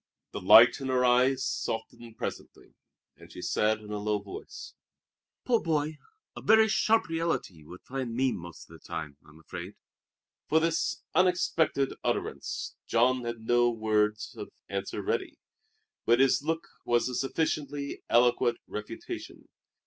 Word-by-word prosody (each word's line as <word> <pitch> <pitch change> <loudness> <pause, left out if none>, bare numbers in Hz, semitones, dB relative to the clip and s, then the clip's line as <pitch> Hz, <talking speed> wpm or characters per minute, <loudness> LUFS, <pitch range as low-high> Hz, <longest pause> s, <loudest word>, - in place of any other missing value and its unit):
The - - -6
light 120 +5 +8
in 135 - -3
her 130 -1 +2
eyes 130 +1 +3
softened 115 -1 -4
presently, - - -7 0.4
and - - -16
she - - -10
said 110 0 +1
in 105 0 -10
a 105 - -3
low 105 0 0
voice: 100 -1 -9 0.7
"Poor 235 -2 +3
boy, 155 -2 -1 0.4
a - - -8
very 220 0 +5
sharp 220 +1 +2
reality 165 - -1
you 80 +4 -12
find 130 -3 -4
me 130 +1 +2
most 85 -1 -8
of - - -16
the - - -15
time, 75 -3 -6
I'm 75 +1 -18
afraid." 90 +4 -8 0.7
For 160 - +5
this 160 -9 -1
unexpected 165 -5 +2
utterance - - -3
Jean 125 +2 +2
had 115 -1 -4
no 120 +1 +3
words 110 -1 0
of - - -7 0.2
answer 100 0 -4
ready, - - -2 0.7
but 120 +2 +5
his 135 0 +4
look 160 +2 -2 0.2
was 120 +1 +2
a 125 - -4
sufficiently 140 +2 -2
eloquent 120 0 +3
refutation. 105 +2 -7
120 Hz, 145 wpm, -29 LUFS, 110-145 Hz, 0.7 s, light